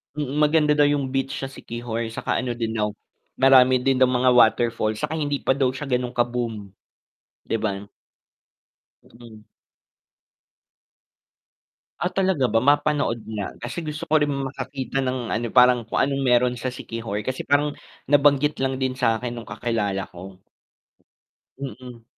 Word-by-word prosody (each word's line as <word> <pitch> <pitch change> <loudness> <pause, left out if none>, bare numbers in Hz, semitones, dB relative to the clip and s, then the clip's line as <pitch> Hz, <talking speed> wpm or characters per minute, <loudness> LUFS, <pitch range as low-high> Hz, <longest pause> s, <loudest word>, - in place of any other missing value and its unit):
mm, 145 0 -3
maganda 150 0 +3
daw 145 -1 +5
yung 140 -2 0
beach 135 0 -2
sa 135 - -3
Siquijor, 115 -2 -5
saka - - -1
ano 125 -2 -3
din 115 -1 -3
daw 105 -1 -1 0.4
marami 130 -1 +6
din 135 0 +1
daw 130 - +6
mga 125 0 +3
waterfall 115 -2 +3
saka 155 - -3
hindi 145 -2 -1
pa 135 - +3
daw 135 -2 +2
siya 150 - -6
ganung 125 0 -1
ka 120 - +4
boom, 115 -5 -4 0.8
'di - - 0
ba? 100 -2 -2 1.2
Mm. 115 -3 -15 2.5
Ah, 180 - -2
talaga 190 -8 +1
ba, 115 0 +2
mapanood 145 -4 +1
na 105 -3 -5
kasi 120 +9 -5
gusto 155 +1 -5
ko 155 -2 +2
rin 150 - +2
makakita 135 -1 -3
ng 130 -2 -2
ano, 120 +1 -1
parang 125 0 +5
kung - - -2
anong 140 0 +1
meron 125 -1 +3
sa 125 +1 -4
Siquijor 115 -4 -5
kasi 130 0 -3
parang 145 +1 +1 0.3
nabanggit 145 0 +3
lang 135 0 0
din 130 -1 -1
sakin 120 -2 0
nung 120 -1 -9
kakilala 105 -5 -2
ko. 90 +1 -10 1.2
Mm. 125 -2 -8
125 Hz, 150 wpm, -23 LUFS, 115-140 Hz, 2.5 s, marami